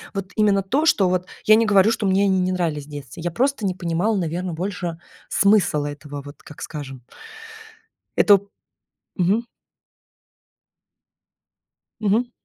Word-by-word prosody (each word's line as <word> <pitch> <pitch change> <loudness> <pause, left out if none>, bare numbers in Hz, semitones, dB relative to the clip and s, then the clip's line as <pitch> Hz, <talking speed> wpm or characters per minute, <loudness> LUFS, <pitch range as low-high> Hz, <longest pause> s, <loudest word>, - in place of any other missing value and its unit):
Вот 195 0 -4
именно 205 -2 +3
то, 270 +11 0
что 195 - +4
вот 180 0 -1 0.2
я 215 - +7
не 225 +1 +3
говорю, 200 +1 +5
что 225 -2 -2
мне 190 +1 +3
они 190 -2 +2
не 185 0 0
нравились 165 -6 -2
в - - -17
детстве. 145 +2 -9
Я 175 - 0
просто 260 +3 0
не 185 - -2
понимала, 180 +5 0
наверно, 175 0 -3
больше 175 -1 -4 0.3
смысл 200 -7 +3
этого. 145 0 -7
Вот 145 +1 -12
как 150 - -13
скажем. 135 -5 -7 1.1
Эту 200 -1 +4 0.7
Мгм. 205 +6 +1 2.5
Мгм. 225 +4 +1
185 Hz, 140 wpm, -22 LUFS, 165-205 Hz, 2.5 s, я